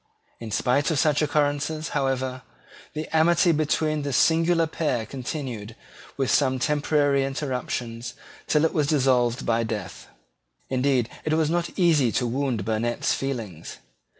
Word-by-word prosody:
In 115 - -7
spite 125 +6 +1
of 160 - 0
such 150 +1 +2
occurrences, 150 +1 0
however, 130 -1 -1 0.5
the 155 +1 -4
amity 170 +2 +4
between 155 0 0
this 140 -3 -1
singular 165 +1 +3
pair 150 -7 -2
continued, 125 -4 -6 0.4
with 135 -2 0
some 130 -2 +2
temporary 145 0 +1
interruptions, 125 -3 -4 0.3
till 150 +1 +3
it 160 - 0
was 150 -3 +1
dissolved 130 -5 +2
by 115 0 +2
death. 110 -2 -5 0.6
Indeed, 130 -2 +1 0.2
it 155 - 0
was 160 -1 +2
not 175 0 -2
easy 155 -9 +3
to 125 - 0
wound 120 -4 -1
Burnet's 115 +2 0
feelings. 115 - -5
135 Hz, 135 wpm, -25 LUFS, 120-155 Hz, 0.6 s, amity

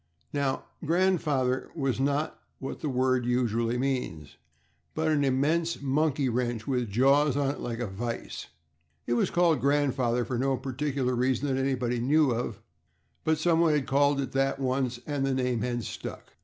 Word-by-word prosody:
Now, 140 -2 -1 0.2
"grandfather" 155 -7 +1
was 135 -5 -1
not 140 +3 0 0.2
what 135 - -6
that 150 - -2
word 130 -1 +1
usually 120 -1 0
means, 125 - -3 0.6
but 160 0 +1
an 150 -2 +2
immense 155 +6 +1
monkey 140 0 +1
wrench, 120 -2 -1
with 125 -4 -1
jaws 135 +5 +3
on 140 -1 +1
it - - -8
like 115 -1 -4
a 120 - -1
vise. 115 +4 -5 0.6
It 120 - 0
was 120 - +2
called 170 -6 +3
grandfather 130 -4 +1
for 120 +1 -2
no 135 0 +1
particular 130 0 -2
reason 130 +3 +1
that 130 - 0
anybody 125 -3 0
knew 145 +3 +3
of, 115 -3 -3 0.6
but 160 0 +2
someone 165 0 +3
had 145 -3 +1
called 140 +1 +3
it 135 -2 -2
that 135 0 0
once, 130 -2 -1
and 145 -2 -2
the 135 -1 +1
name 125 -3 0
had 120 0 -2
stuck. - - -7
135 Hz, 165 wpm, -28 LUFS, 125-145 Hz, 0.6 s, jaws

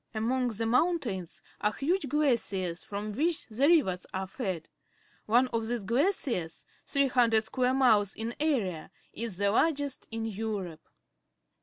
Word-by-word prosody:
Among 250 +4 +1
the 225 -1 -2
mountains 235 - 0 0.2
are 210 0 +1
huge 320 - -1
glaciers 215 - 0
from 205 +1 -5
which 320 +8 0
the 250 +6 +2
rivers 235 - +3
are 190 0 -2
fed. 190 - -4 0.6
One 240 +4 +4
of 225 -2 -2
these 240 -2 -2
glaciers, 235 - 0 0.2
300 245 -5 +3
square 255 +3 0
miles 220 -7 +3
in 225 +2 -3
area, 225 - 0 0.2
is 225 -5 -4
the 200 0 +2
largest 285 +2 +1
in 225 0 -4
Europe. 205 -6 -4
225 Hz, 135 wpm, -29 LUFS, 200-270 Hz, 0.6 s, One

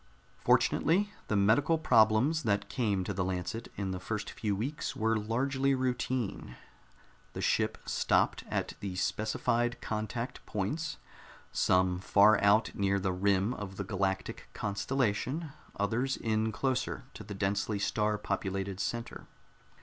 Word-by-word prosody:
Fortunately, 200 +6 +3
the 105 - 0
medical 110 +11 +4
problems 125 +2 +4
that 100 -5 0
came 105 -7 0
to 100 - -3
the 95 0 -1
Lancet 95 +5 -3
in 95 -2 -2
the 95 - -3
first 105 +2 -4
few 105 -3 -2
weeks 130 +9 -3
were 110 +1 +1
largely 130 +5 +1
routine. 125 - -2 0.8
The - - -5
ship - - +1
stopped - - +1
at - - -2
the 95 -2 -4
specified 115 +5 0
contact 110 +3 -4
points 105 - -2 0.5
some 90 -1 +2
far 100 +2 +5
out 105 +2 +4
near 100 0 +1
the 95 -1 0
rim 100 +4 +2
of 100 -4 -7
the 100 - -2
galactic 95 -1 -2
constellation, 130 +8 -1 0.2
others 115 +7 0
in 110 0 0
closer 130 +2 -1
to - - -9
the 100 0 -7
densely 100 +2 0
star 105 +1 0
populated 95 -1 -3
center. 120 +2 -4
105 Hz, 135 wpm, -31 LUFS, 100-120 Hz, 0.8 s, far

